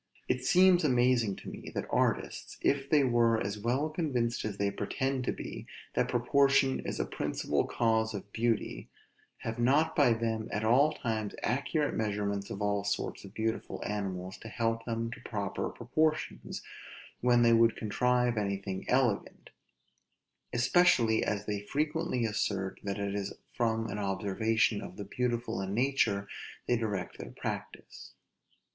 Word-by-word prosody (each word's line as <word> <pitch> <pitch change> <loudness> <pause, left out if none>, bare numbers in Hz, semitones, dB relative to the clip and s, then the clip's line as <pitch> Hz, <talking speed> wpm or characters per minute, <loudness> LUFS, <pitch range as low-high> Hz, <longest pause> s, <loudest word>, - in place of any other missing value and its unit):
It 125 - 0
seems 180 +4 +5
amazing 125 -6 +3
to - - -12
me, - - -8
that - - -2
artists, - - 0
if 140 -1 +1
they 150 -2 +5
were 120 -3 +3
as 100 +1 -3
well 125 +7 +1
convinced 135 -8 -1
as 105 -2 -4
they 100 0 +1
pretend 130 +6 -2
to - - +1
be, - - -7 0.3
that - - +1
proportion 135 +2 +3
is - - -4
a - - +1
principal - - -1
cause 110 -1 +1
of 100 0 -8
beauty, 115 - -1 0.5
have 115 +1 -4
not 145 +7 +3
by 135 -6 +5
them 115 -1 -2
at 105 - -1
all 130 +7 +5
times 110 -7 -3
accurate 145 +3 0
measurements 100 -2 -1
of 100 - -4
all 100 -1 +1
sorts 100 - -2
of 100 +2 -12
beautiful 110 0 -2
animals 95 -3 -4
to - - -10
help 115 0 -1
them 115 0 -2
to - - -8
proper 100 -3 -3
proportions, 150 - -1 0.6
when 120 -1 +4
they 115 0 +6
would 115 -1 +5
contrive 125 +2 +1
anything 100 -1 -3
elegant; 125 -5 0 1.0
especially 120 -4 +4
as 105 -1 -1
they 105 -1 -2
frequently 150 +2 -1
assert 100 -3 -1
that 100 0 -2
it 100 -1 -2
is 100 -1 -3 0.2
from 115 -2 0
an 105 0 -4
observation 105 +2 +1
of - - -9
the 100 - -5
beautiful 120 0 -1
in 95 +1 -3
nature 120 -6 +1 0.4
they 120 - +2
direct 105 -6 -3
their - - -7
practice. - - -7
115 Hz, 150 wpm, -31 LUFS, 105-125 Hz, 1.0 s, they